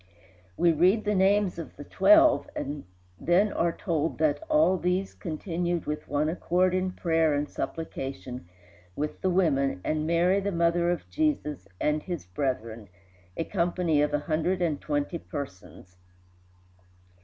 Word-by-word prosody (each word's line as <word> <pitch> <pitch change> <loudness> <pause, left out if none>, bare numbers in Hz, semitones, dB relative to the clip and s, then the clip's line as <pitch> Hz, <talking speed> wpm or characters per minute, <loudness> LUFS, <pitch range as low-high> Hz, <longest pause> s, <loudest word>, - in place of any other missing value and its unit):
We 170 - +4
read 185 +7 +3
the 210 - +1
names 195 -1 +2
of 165 - -8
the - - -9
twelve, 315 - +5
and 145 -4 -5 0.3
then 190 +5 +2
are 170 0 +1
told 165 -2 -2
that 155 -2 +2 0.4
"these 180 +2 0
all - - -30
continued 175 0 -3
with 150 0 -4
one 145 +1 0
accord 180 +2 +1
in 185 0 0
prayer 160 -4 +1
and 145 +1 -1
supplication 135 - -6 0.5
with 150 +1 -4
the 190 - +1
women, 140 - +1
and 155 0 -1
Mary 175 +4 +3
the 200 +1 -2
mother 170 0 +2
of 175 - -2
Jesus, 300 - -1
and 150 0 +1
his 175 - -5
brethren," 115 0 -3 0.5
a - - 0
company 170 -4 0
of 150 0 +1
a 150 - +1
hundred 165 +3 0
and 165 -5 -1
twenty 145 +3 -2
persons. 95 -7 -9
165 Hz, 145 wpm, -27 LUFS, 150-185 Hz, 0.5 s, twelve